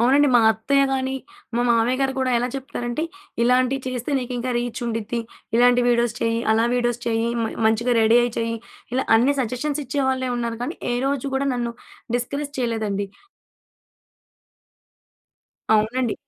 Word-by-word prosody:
అవునండి. 275 +4 +5
మా 240 - +7
అత్తయ్యగాని, 265 +3 +1 0.4
మా - - +2
మామయ్యగారు 255 +4 +2
కూడా 260 -1 +1
ఎలా 245 +1 -1
చెప్తారంటే, 245 +1 -4 0.4
"ఇలాంటివి 255 +2 +2
చేస్తే 255 +2 -3
నీకు 250 0 -5
ఇంకా 250 +1 -2
రీచ్ 240 0 -3
ఉండిద్ది. 230 +1 -2 0.4
ఇలాంటి 245 0 +5
వీడియోస్ 235 -1 +2
చెయ్, 230 0 +1
అలా 225 +1 +3
వీడియోస్ 240 -1 0
చెయ్, 225 0 +1 0.2
మ - - +1 0.2
మంచిగా 235 +3 +2
రెడీ 225 +2 +5
అయ్యి 240 -1 -1
చెయ్" 230 0 -1 0.4
ఇలా 260 - +1
అన్ని 265 +5 +3
సజెషన్స్ 265 +5 -2
ఇచ్చేవాళ్ళెవున్నారు 255 -3 -1
కానీ, 310 +7 -4 0.2
ఏ - - +1
రోజు 275 0 -1
కూడా 275 +1 0
నన్ను 240 -1 -2 0.4
డిస్కరేజ్ 280 +4 -4
చేయలేదండి. 215 -5 -1 2.7
అవునండి. 225 +2 +1
245 Hz, 135 wpm, -23 LUFS, 230-260 Hz, 2.7 s, మా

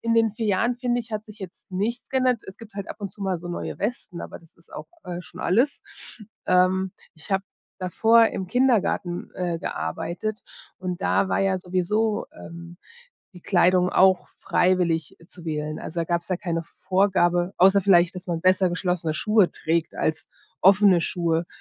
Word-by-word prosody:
in 230 0 0
den 225 -1 +4
4 220 +1 -4
Jahren 230 +5 +1
finde 245 -1 0
ich, 235 0 -11
hat 215 0 -4
sich 215 -1 -12
jetzt 190 +1 -11
nichts 225 +6 -2
geändert. 255 -3 +1
Es 190 - -10
gibt 225 -3 -14
halt 200 -1 -6
ab - - -7
und 200 -2 -5
zu 205 - -19
mal 190 -2 0
so 175 +1 -9
neue 175 - -5
Westen, 205 -5 -4
aber - - -8
das 165 -1 -20
ist 170 - -20
auch, - - -7 0.2
äh, 175 0 -5
schon - - -12
alles. 240 +10 +1 0.6
Ähm, 185 +1 +3 0.2
ich 160 +4 -6
habe 190 0 +2 0.4
davor 225 +5 +4
im 190 - -5
Kindergarten, 225 -7 +1
äh, 175 -2 -2
gearbeitet 175 - -4 0.4
und 185 0 -4
da 190 - +2
war - - +1
ja 190 -1 +1
sowieso, 195 +5 0
ähm, 170 +1 -11 0.6
die 180 - -12
Kleidung 180 0 +3
auch 190 0 +4
freiwillig 175 -4 0
zu 175 - -14
wählen. 155 -1 -3
Also, 170 +1 -4
da 165 - 0
gab's 170 +1 -2
ja 185 - 0
keine 170 -4 -3
Vorgabe, 185 -1 +1
außer 195 +2 +5
vielleicht, 180 -1 +4
dass 180 +2 -8
man 170 -2 -2
besser 185 +1 +4
geschlossene 175 -3 -1
Schuhe 210 +2 +3
trägt, 165 0 -1
als 155 - -2 0.3
offene 195 -1 +6
Schuhe, 170 -1 0
185 Hz, 180 wpm, -24 LUFS, 175-210 Hz, 0.6 s, offene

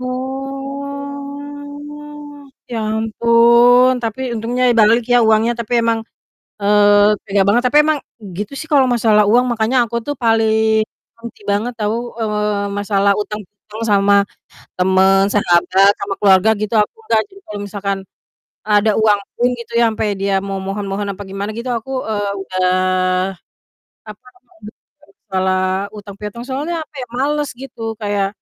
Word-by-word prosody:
Oh, 280 +2 -7 0.2
ya 225 - -2 0.2
ampun, 235 +3 +4
tapi 240 +2 -3
untungnya 240 +3 -1 0.2
balik 225 +3 +4
ya 245 - +6
uangnya, 220 +2 +3
tapi 230 +1 -6
emang, 230 -1 +1 0.6
eee, 205 0 +4
tega 200 -1 +1
banget, 235 +5 +3
tapi 295 - +5
emang 310 -2 +2 0.4
gitu 210 +5 -4
sih 315 - -6
kalau 275 -3 +5
masalah 220 -3 +3
uang, 245 +2 +4
makanya 225 +3 0
aku 235 - -5
tuh 290 - -2
paling 220 -1 +2 0.3
benci 230 -2 -11
banget 210 +5 0
tau, 210 +1 -1 0.2
eee, 210 -2 -1
masalah 200 -1 +2
utang-utang 210 +1 -7
sama 200 0 +4 0.6
temen, 190 +1 +4
sahabat, 195 0 +3
sama 200 - -3
keluarga 195 +1 +4
gitu 215 0 -3
aku 210 - -2
nggak 435 - +2
sih, 390 - -20
kalau 210 -1 -7
misalkan 200 0 -3 0.7
ada 210 0 +3
uang 210 -2 +4 0.2
pun 245 +1 +1
gitu 235 0 -10
ya, 235 - +4
sampai 220 0 -2
dia 195 0 0
memohon-mohon 195 +1 -4
apa 200 - -9
gimana 195 +2 -5
gitu, 240 +2 -5
eee, - - 0
aku 265 - -8 0.5
udah, 185 0 0 0.7
apa 210 +2 -12
namanya, 220 -4 -15 0.3
kalo 290 - -24 0.2
masalah 190 -1 0 0.4
utang-piutang, 210 +3 -8
soalnya 290 +6 -3 0.2
kayak 250 -3 -6
males 290 +2 0
gitu 270 -4 -10 0.2
kayak, 205 -1 0
220 Hz, 135 wpm, -17 LUFS, 200-255 Hz, 0.7 s, ya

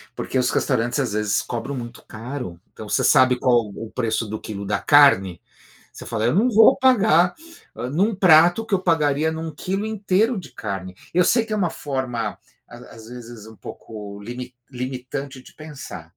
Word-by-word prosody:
porque 130 - -2
os 125 - +1
restaurantes, 120 +5 0
às 125 -7 -1
vezes, 105 -1 0
cobram 120 +3 -5
muito 120 -1 -8
caro. 110 -6 -7
Então 110 - -10
você - - 0
sabe 130 -3 +5
qual 120 -3 +2
o 110 +2 -9
preço 115 -2 -2
do 110 +1 -5
quilo 100 -2 -7
da 100 0 -1
carne, 100 - +4 0.5
você - - -11
fala: 115 +1 -1
"Não 225 +8 +3
vou 220 0 +6
pagar, 215 - +4 0.4
ah, 120 +2 -4
num 195 - +1
prato 175 +2 +5
o - - -12
que 205 - 0
eu 185 - +1
pagaria 155 -2 +1
num 160 -1 -6
quilo 195 +7 -3
inteiro 215 +1 0
de 165 - -10
carne." 95 -3 -6 0.2
Eu 180 0 +4
sei 235 -2 +3
que 215 - -7
é - - 0
uma 180 -5 0
forma, 125 -7 -4 0.3
às - - -12
às 115 0 -13
vezes 120 -3 -10
um 110 -1 -14
pouco 105 -2 -9
limi 125 +3 -8 0.2
limitante 130 +2 -6
de - - -17
pensar. 150 - -9
130 Hz, 185 wpm, -22 LUFS, 110-170 Hz, 0.5 s, vou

